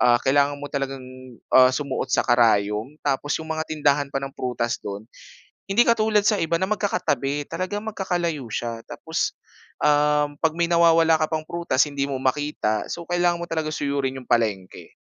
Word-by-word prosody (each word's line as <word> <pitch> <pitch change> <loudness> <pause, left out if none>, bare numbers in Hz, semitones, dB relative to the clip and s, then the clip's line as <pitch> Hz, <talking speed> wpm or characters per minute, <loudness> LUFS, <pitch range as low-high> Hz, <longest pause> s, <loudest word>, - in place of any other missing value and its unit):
ah, 120 -1 +5
kailangan 140 +1 +3
mo 145 0 -8
talagang, 135 -2 -3 0.5
ah, 130 0 +7
sumuot 140 -2 -3
sa - - +3
karayom 110 +1 +2
tapos 145 +1 -1
'yung 160 - -10
mga 160 0 -2
tindahan 145 -2 +1
pa 140 - -5
ng 135 - -4
prutas 125 -3 -2
do'n, 100 0 -6 0.7
hindi 210 +5 +5
katulad 220 -2 +3
sa 210 -2 +3
iba 165 +1 +1
na 190 - 0
magkakatabi, 180 -8 -1
talagang 185 +5 -4
magkakalayo 175 -7 -2
siya. 115 -1 -4
Tapos, - - -3 0.5
um, 150 0 +3
'pag 160 -1 +3
may 170 - +3
nawawala 165 -1 +5
ka 155 - +1
pang 160 -1 -1
prutas, 170 -5 +1
hindi 140 -1 -2
mo 135 - -2
makita, 130 -6 -1
so 170 - -4
kailangan 175 0 +1
mo 170 - -5
talaga 160 -1 -1
suyurin 140 -2 -2
yung 125 - -11
palengke. 105 -5 -1
145 Hz, 170 wpm, -23 LUFS, 130-170 Hz, 0.7 s, ah